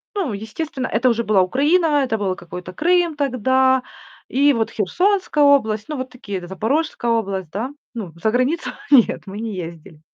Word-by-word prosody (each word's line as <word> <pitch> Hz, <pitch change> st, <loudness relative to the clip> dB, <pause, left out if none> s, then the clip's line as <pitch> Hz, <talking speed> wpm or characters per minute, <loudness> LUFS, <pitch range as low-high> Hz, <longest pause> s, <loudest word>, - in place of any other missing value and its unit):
Ну, 355 Hz, -, -1 dB
естественно, 255 Hz, +7 st, -4 dB
это 240 Hz, +3 st, +2 dB
уже 235 Hz, -1 st, +1 dB
была 200 Hz, -3 st, +4 dB
Украина, 295 Hz, -, +2 dB
это 225 Hz, -4 st, -1 dB
было 195 Hz, -3 st, -1 dB
какой-то 180 Hz, 0 st, -9 dB
Крым 345 Hz, -, +2 dB
тогда. 260 Hz, -1 st, +2 dB, 0.5 s
И 285 Hz, +2 st, +4 dB
вот 225 Hz, -3 st, -1 dB
Херсонская 355 Hz, -, +1 dB
область, 220 Hz, -6 st, +3 dB
ну, 300 Hz, -, -3 dB
вот 260 Hz, 0 st, -5 dB
такие, 200 Hz, -8 st, -6 dB
Запорожская 235 Hz, -, -1 dB
область, 195 Hz, -7 st, -1 dB
да. 220 Hz, +9 st, -3 dB, 0.2 s
Ну, 200 Hz, -8 st, -6 dB
за 220 Hz, -, +3 dB
границу 255 Hz, +8 st, 0 dB, 0.2 s
нет, 265 Hz, -6 st, +5 dB
мы 200 Hz, +2 st, -7 dB
не 225 Hz, -2 st, -4 dB
ездили. 165 Hz, -3 st, -8 dB
240 Hz, 165 wpm, -20 LUFS, 200-285 Hz, 0.5 s, нет